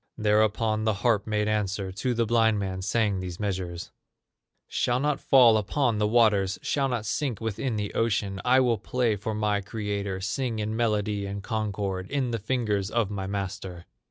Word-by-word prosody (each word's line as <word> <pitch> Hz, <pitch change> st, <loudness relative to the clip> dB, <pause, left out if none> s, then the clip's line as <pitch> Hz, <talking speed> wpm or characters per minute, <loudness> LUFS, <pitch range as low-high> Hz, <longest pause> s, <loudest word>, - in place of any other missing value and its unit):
Thereupon 110 Hz, 0 st, +2 dB
the 110 Hz, -2 st, +2 dB
harp 110 Hz, -4 st, +2 dB
made 105 Hz, -1 st, 0 dB
answer, 100 Hz, -2 st, -1 dB
To 120 Hz, +6 st, -2 dB
the 115 Hz, 0 st, +1 dB
blind 115 Hz, -1 st, +3 dB
man 95 Hz, -2 st, -3 dB
sang 105 Hz, 0 st, +1 dB
these 90 Hz, -2 st, -6 dB
measures: 95 Hz, -4 st, -3 dB, 0.8 s
"Shall 120 Hz, +1 st, 0 dB
not 145 Hz, 0 st, 0 dB
fall 120 Hz, -5 st, +6 dB
upon 115 Hz, +1 st, 0 dB
the 105 Hz, -, +2 dB
waters, 105 Hz, -4 st, +3 dB
Shall 140 Hz, -2 st, +1 dB
not 120 Hz, -4 st, -2 dB
sink 120 Hz, 0 st, -2 dB
within 115 Hz, +2 st, -2 dB
the 105 Hz, -1 st, -3 dB
ocean; 100 Hz, -3 st, 0 dB
I 130 Hz, +1 st, +5 dB
will 120 Hz, -4 st, +2 dB
play 120 Hz, +1 st, 0 dB
for 105 Hz, +2 st, -4 dB
my 105 Hz, -1 st, 0 dB
creator, 100 Hz, -2 st, -3 dB
Sing 110 Hz, +5 st, -2 dB
in 110 Hz, 0 st, -2 dB
melody 105 Hz, -3 st, 0 dB
and 100 Hz, 0 st, -5 dB
concord 100 Hz, -4 st, -3 dB
In 135 Hz, -4 st, -1 dB
the 115 Hz, -, -2 dB
fingers 105 Hz, -3 st, -1 dB
of 115 Hz, -3 st, 0 dB
my 95 Hz, -2 st, -3 dB
master." 95 Hz, -3 st, -5 dB
105 Hz, 175 wpm, -27 LUFS, 100-115 Hz, 0.8 s, fall